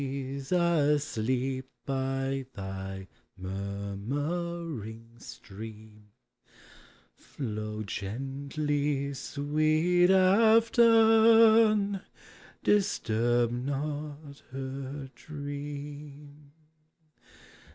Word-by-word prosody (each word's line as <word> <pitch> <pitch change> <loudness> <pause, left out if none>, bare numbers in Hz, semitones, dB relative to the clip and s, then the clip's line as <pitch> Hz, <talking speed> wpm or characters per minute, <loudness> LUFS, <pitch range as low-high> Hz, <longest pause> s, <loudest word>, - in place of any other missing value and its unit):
s 135 0 -5
asleep 140 -6 +1 0.2
by 135 0 -1
thy 95 0 -6 0.3
murmuring 110 - -4
stream, 105 0 -11 1.1
Flow 110 -4 -5
gently, 140 +6 -2
sweet 155 +6 +1
Afton, 225 0 +5 0.6
disturb 120 - +2
not 145 +3 -4
her 135 +1 -6
dream. 145 0 -8
140 Hz, 45 wpm, -29 LUFS, 120-155 Hz, 1.1 s, Afton